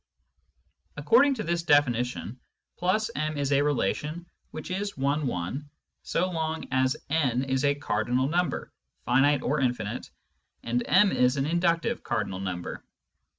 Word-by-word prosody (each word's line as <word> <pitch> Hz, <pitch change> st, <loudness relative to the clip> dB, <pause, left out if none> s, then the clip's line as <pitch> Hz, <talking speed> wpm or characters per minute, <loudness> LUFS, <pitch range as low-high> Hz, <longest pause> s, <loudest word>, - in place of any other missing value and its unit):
Accord 450 Hz, -11 st, +5 dB
ing 275 Hz, -, +1 dB
to 215 Hz, -, -4 dB
this 170 Hz, -1 st, -1 dB
definition, 125 Hz, -5 st, +1 dB, 0.4 s
\ 215 Hz, +6 st, +1 dB
m 155 Hz, 0 st, -2 dB
is 140 Hz, -1 st, -1 dB
a 140 Hz, 0 st, +4 dB
relation 150 Hz, -, -1 dB, 0.2 s
which -, -, -7 dB
is 200 Hz, 0 st, -3 dB
one 140 Hz, +2 st, 0 dB
one 125 Hz, +10 st, -4 dB, 0.3 s
so 180 Hz, +2 st, 0 dB
long 160 Hz, -1 st, -2 dB
as 130 Hz, 0 st, +2 dB
n 135 Hz, -6 st, +1 dB
is 130 Hz, 0 st, -1 dB
a 140 Hz, 0 st, +3 dB
cardinal 125 Hz, -1 st, 0 dB
number 170 Hz, 0 st, -1 dB, 0.3 s
(finite 135 Hz, +4 st, +3 dB
or 150 Hz, +3 st, 0 dB
infinite) 125 Hz, -3 st, -2 dB, 0.5 s
and 120 Hz, +1 st, 0 dB
m 195 Hz, +2 st, +5 dB
is 125 Hz, +2 st, +2 dB
an 135 Hz, -, +1 dB
inductive 170 Hz, +7 st, +1 dB
cardinal 95 Hz, -, -2 dB
number. 90 Hz, -2 st, -5 dB
145 Hz, 145 wpm, -27 LUFS, 125-170 Hz, 0.5 s, Accord